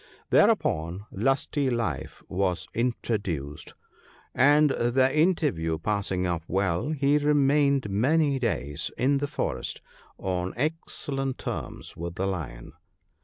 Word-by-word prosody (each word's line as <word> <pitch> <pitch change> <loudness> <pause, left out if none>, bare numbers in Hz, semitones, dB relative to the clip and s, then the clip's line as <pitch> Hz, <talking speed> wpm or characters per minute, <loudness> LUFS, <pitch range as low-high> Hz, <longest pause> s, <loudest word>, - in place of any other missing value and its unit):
" - - -34
Thereupon 85 +6 +2
Lusty 135 +5 0
life 115 - -3
was 90 -3 -1
introduced, 100 - -2 0.6
and, 145 +2 +5
the 130 +2 +2
inter 160 -1 +3
view 80 -1 -2
passing 95 0 -1
off 85 -2 -1
well, 95 - 0
he 145 -1 +2
remained 140 -3 +3
many 140 +8 +2
days 75 - -2
in 140 +2 +2
the 145 - -1
forest - - -3 0.4
on 90 -1 -2
excellent 135 -2 -2
terms - - -6
with 85 +1 -5
the 95 - -1
Lion. 75 -11 -5
115 Hz, 120 wpm, -27 LUFS, 90-140 Hz, 0.6 s, and